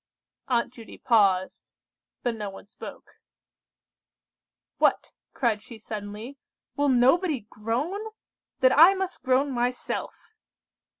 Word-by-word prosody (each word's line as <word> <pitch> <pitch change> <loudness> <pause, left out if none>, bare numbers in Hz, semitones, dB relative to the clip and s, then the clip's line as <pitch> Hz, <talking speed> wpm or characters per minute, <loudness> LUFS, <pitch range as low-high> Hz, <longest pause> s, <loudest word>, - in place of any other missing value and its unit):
Aunt 240 -1 0
Judy 230 -3 -12
paused, 195 -5 +1 0.5
but 240 - 0
no 210 -3 -5
one 195 - -12
spoke. 205 - -12 1.6
"What!" - - +2 0.2
cried 230 -5 +1
she 230 +1 -11
suddenly, 215 +5 -7 0.4
"will 285 0 +2
nobody 265 +4 +3
groan? 280 - -3 0.5
Then 255 0 +6
I 340 +6 +8
must 380 -1 -4
groan 260 +2 +2
myself!" 250 - -3
245 Hz, 105 wpm, -26 LUFS, 220-285 Hz, 1.6 s, I